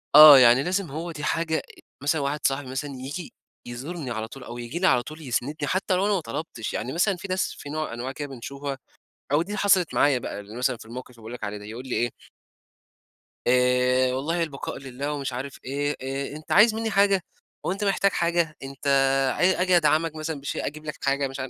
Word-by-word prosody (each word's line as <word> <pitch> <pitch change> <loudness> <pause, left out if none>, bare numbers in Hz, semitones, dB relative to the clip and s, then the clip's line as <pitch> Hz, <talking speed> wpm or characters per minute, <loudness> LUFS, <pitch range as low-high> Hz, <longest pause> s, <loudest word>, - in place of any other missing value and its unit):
آه، 150 -3 +12
يعني 125 +2 +6
لازم 185 -2 -1
هو 165 +4 -4
دي 150 -2 -7
حاجة 160 0 0 0.4
مثلًا 145 +1 +1
واحد 140 +2 -1
صاحبي 135 0 -3
مثلًا 135 +3 -4
ييجي 145 +7 -6 0.3
يزورني 135 +3 -5
على 110 -1 -3
طول، 130 +2 -11
أو 120 - -8
ييجي 120 +8 -5
لي 185 - +3
على 125 -2 +4
طول 155 +1 -10
يسندني، 130 +2 -2
حتى 185 +2 0
لو 190 - +1
أنا 210 - +2
ما 195 - +2
طلبتش، 115 -2 -5
يعني 125 +6 -3
مثلًا 185 +3 +2
في 190 +3 -8
ناس 185 0 0
في 145 - -9
نوع 155 -4 -3
أنواع 125 +3 -4
كده 145 +2 -5
بنشوفها، 140 +2 -6 0.6
أو 150 +3 +4
دي - - -8
اللي 210 - -3
حصلت 190 -4 +3
معايا 145 -3 +4
بقى، 105 - -6
ال 105 +3 -11
مثلًا 125 0 +1
في - - -13
الموقف 125 +3 -8
اللي 125 - -18
باقول 110 +2 -9
لك 125 - -6
عليه 105 0 -4
ده، 105 - -11
يقول 115 +5 -8
لي - - -2
إيه. 120 0 +1 1.4
آآ، 125 +1 +3
والله 165 +6 0
البقاء 145 -4 -5
لله 135 +2 -5
ومش 135 -3 -3
عارف 135 +2 -6
إيه 145 +2 -1
آآ، 135 +2 -4
أنت 155 - -10
عايز 215 +3 +6
مني 225 0 -2
حاجة؟ 200 -2 +3 0.4
هو - - +1
أنت 200 +2 -3
محتاج 200 0 +2
حاجة؟ 170 -3 0
أنت 135 +1 -7 0.5
ع 180 +1 +3
آجي 185 -1 +4
أدعمك 160 0 +2
مثلًا 155 -1 -4
بشيء، 140 - -3
أجيب 155 +1 -7
لك 150 - -5
حاجة 140 0 +1
مش 135 - -8
عار 130 0 -4
145 Hz, 220 wpm, -25 LUFS, 125-170 Hz, 1.4 s, آه